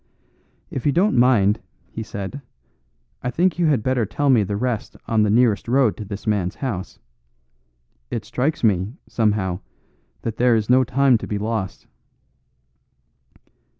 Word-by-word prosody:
"If 135 +1 -2
you - - +4
don't 185 +6 +2
mind," 115 -4 +4 0.3
he 110 - -5
said, 105 +5 -6 0.8
"I 125 - -2
think 175 +6 +1
you 170 - +3
had 140 -8 +2
better 130 -2 +1
tell 140 +6 +1
me 120 -4 +5
the 100 0 -2
rest 120 -1 -3
on 110 -1 +2
the 105 - +3
nearest 115 -1 +3
road 125 -2 +3
to 105 - -6
this 100 0 -7
man's 100 -4 0
house. 110 -10 -4 1.1
It 115 - -4
strikes 140 +4 -1
me, 100 0 +2
somehow, 105 -5 0 0.6
that 115 -2 -3
there 125 -1 +4
is 110 +1 0
no 130 +1 +6
time 130 -1 +3
to - - -7
be 105 - -2
lost." 100 -4 -3
115 Hz, 150 wpm, -22 LUFS, 105-130 Hz, 1.1 s, no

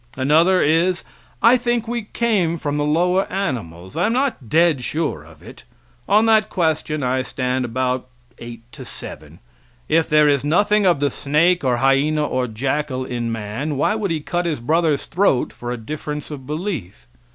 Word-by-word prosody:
Another 160 +8 +4
is, 170 +4 +2 0.4
I 235 +2 +7
think 240 -2 -1
we 235 -2 -3
came 195 -8 +1
from 145 -2 -3
the 145 - 0
lower 180 +5 +1
animals, 95 - -4
I - - +1
am 225 - 0
not 255 - -1
dead 160 -4 +3
sure 150 - -2
of 80 0 -17
it. - - -13 0.5
On 210 +3 +5
that 220 -1 +3
question 155 -4 -1
I 130 +1 +1
stand 130 0 -2
about 125 +1 -2 0.3
eight 115 -1 -9
to - - -10
seven. - - -9 0.5
If 165 0 +2
there 150 0 +5
is 140 -2 +2
nothing 205 +6 +3
of 170 -6 +2
the 145 -2 +1
snake, 165 +7 +1
or 125 -2 +1
hyena, 140 +4 +2
or 130 -3 -1
jackal 130 +3 -2
in 120 -2 -3
man, 115 +7 -4
why 145 - +2
would 215 -2 -2
he 160 -2 -1
cut 175 +3 -2
his 155 -5 -2
brother's 155 +3 +1
throat 170 -7 +1
for 120 - -7
a 125 - -3
difference 150 +5 -6
of 135 -3 -8
belief? 150 - -5
150 Hz, 175 wpm, -20 LUFS, 130-180 Hz, 0.5 s, I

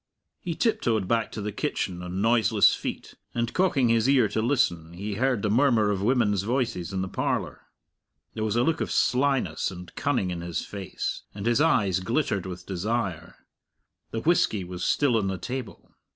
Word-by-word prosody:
He 170 -2 -4
tiptoed 115 - +1
back 115 0 0
to 105 - -5
the 105 - -2
kitchen 90 -2 -3
on 90 +2 -3
noiseless 110 -2 +4
feet, - - -5 0.2
and 120 -1 -1
cocking 155 -10 +2
his 115 +2 +3
ear 130 -5 +5
to 110 - -1
listen, 90 - 0
he 100 +4 -5
heard 125 0 0
the 105 - +1
murmur 115 -4 +3
of 95 -2 -1
women's 105 -4 +2
voices 115 -6 -1
in 95 -1 -2
the - - -3
parlour. - - -3 0.7
There 110 - -3
was 110 0 0
a 120 - +3
look 165 +3 0
of - - -2
slyness 130 - +1
and 90 -1 -10
cunning 125 -10 0
in 85 -1 -4
his 85 -1 -3
face, 95 -2 -4
and 100 0 -6
his 120 +4 +3
eyes 100 - +3
glittered 105 - -1
with 90 -1 -7
desire. 100 -1 -3 0.6
The 115 - -4
whisky 115 - +2
was 90 0 -6
still 140 -5 +2
on 100 -3 0
the 95 -1 -2
table. 125 +5 -7
110 Hz, 180 wpm, -26 LUFS, 95-125 Hz, 0.7 s, ear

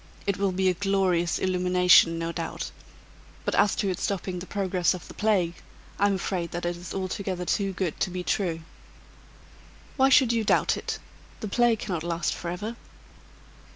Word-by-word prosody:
It 200 -2 0
will 200 -1 +1
be 190 +1 +1
a 185 - +4
glorious 185 -2 +1
illumination, 180 -2 +4
no 165 0 -2
doubt; 165 -1 -4 0.7
but - - 0
as 205 0 +3
to 200 - -1
its 180 - -3
stopping 185 -2 -2
the 180 - -8
progress 185 -2 +1
of 180 - -10
the - - -10
plague, 195 -6 +1 0.5
I 205 - +4
am 200 - +1
afraid 180 -2 -2
that 175 0 -3
it 175 0 -1
is 175 +1 -9
altogether 185 -1 -3
too 195 +2 0
good 180 -4 -3
to - - +1
be 180 0 -4
true." 175 -4 -1 1.4
"Why 265 0 +5
should 260 -3 +5
you 230 -1 +1
doubt - - +3
it? - - -4 0.4
The 215 - -3
plague 240 +2 +3
cannot 180 -6 -3
last 170 0 -1
forever." 200 +7 -5
185 Hz, 175 wpm, -26 LUFS, 175-200 Hz, 1.4 s, Why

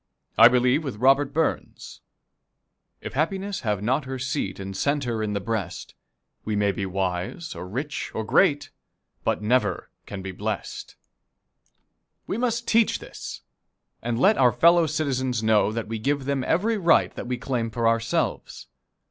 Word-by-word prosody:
I 115 - +9
believe 125 +4 +3
with 135 -6 -4
Robert 135 +5 +3
Burns: 160 +1 -3 1.0
"If - - -7
happiness 190 +7 -1
have 105 -3 -2
not 130 +6 0
her 130 0 -4
seat 125 -7 -3
And 95 0 -6
center 130 -2 -1
in 105 -1 -2
the 100 - -1
breast, 100 -3 -4 0.5
We 110 - -2
may 100 -1 +2
be 95 0 -4
wise, 95 - -3
or 90 - -7
rich, 140 - -4
or 110 - -2
great, 145 - +2 0.5
But - - -1
never 105 -5 0 0.2
can 95 -2 -7
be 95 - -5
blest." 95 - -5 1.3
We - - -3
must 235 -1 -1
teach 230 -1 +3
this, - - -9 0.6
and 120 0 -2
let 205 +9 +4
our 125 -2 +5
fellow 170 +7 +5
citizens 130 -6 -1
know 110 -1 +3
that 115 -1 -4
we 110 0 -4
give 140 +3 -1
them 140 -1 -1
every 210 +6 +1
right 170 -3 +3
that - - -7
we 125 0 -2
claim 120 -1 -2
for 115 +1 0
ourselves. 115 0 -1
125 Hz, 155 wpm, -25 LUFS, 105-145 Hz, 1.3 s, I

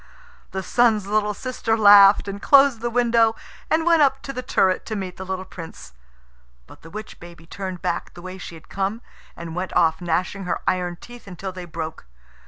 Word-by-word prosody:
The 190 0 -4
Sun's 225 -2 +2
little 210 0 0
sister 245 -2 -2
laughed, 205 -1 +7
and 200 0 -6
closed 275 -4 +5
the 240 - -1
window, 230 -2 +2 0.3
and 320 +1 +1
went 335 -2 +4
up 275 -1 +2
to 275 - -6
the 255 - -4
turret 190 -6 +1
to 220 - -3
meet 190 -3 -5
the 190 - -7
little 190 0 -4
Prince. 165 - -11 0.7
But - - -16
the 165 - -13
witch 215 +4 -9
baby 170 -1 -13
turned 185 0 -7
back 175 -2 -3
the 175 - -11
way 185 0 -8
she 175 - -9
had 160 - -15
come, 200 +4 -3 0.3
and 170 -1 -7
went 185 +1 -4
off, 160 -1 +2
gnashing 180 +3 -2
her 180 - -2
iron 180 -1 -1
teeth 240 -2 -13
until 190 +1 -6
they 180 -1 -8
broke. 160 - -7
195 Hz, 195 wpm, -22 LUFS, 180-225 Hz, 0.7 s, laughed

